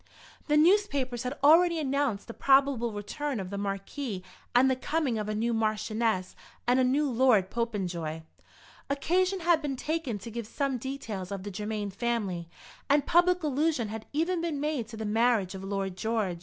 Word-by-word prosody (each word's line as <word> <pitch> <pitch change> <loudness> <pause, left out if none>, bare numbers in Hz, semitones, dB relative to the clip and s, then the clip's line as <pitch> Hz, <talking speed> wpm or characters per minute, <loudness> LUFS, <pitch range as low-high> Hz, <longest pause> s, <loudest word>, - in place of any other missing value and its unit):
The 300 -1 +3
newspapers 300 - +3
had 250 +3 -4
already 335 +3 +6
announced 275 -7 0
the 230 - -8
probable 270 -3 +3
return 230 +6 -4
of 185 -1 -5
the 200 - -3
Marquis 195 +2 -4 0.3
and 250 +2 +6
the 260 - +3
coming 265 -3 -1
of 210 0 -3
a 215 - -1
new 230 +2 0
Marchioness 215 -2 0 0.3
and 245 +2 +3
a - - +4
new 280 +4 +2
Lord 235 -7 +3
Popenjoy. 180 -9 -3 0.7
Occasion 365 +7 +1
had 335 -1 +3
been 285 -3 -2
taken 300 -4 -2
to 230 +4 -9
give 230 -1 -5
some 275 0 -1
details 220 -8 -5
of 195 -2 -4
the 205 - -5
Germain 210 +1 -3
family, 200 -6 -2 0.4
and 285 0 +4
public 355 +1 +3
allusion 295 -5 0
had 220 0 -7
even 330 +4 0
been 330 -4 -2
made 295 -6 -1
to 225 -1 -9
the 220 - -4
marriage 220 -3 +2
of 190 0 -7
Lord 195 -1 -3
George. 210 -4 -1
240 Hz, 175 wpm, -29 LUFS, 205-290 Hz, 0.7 s, already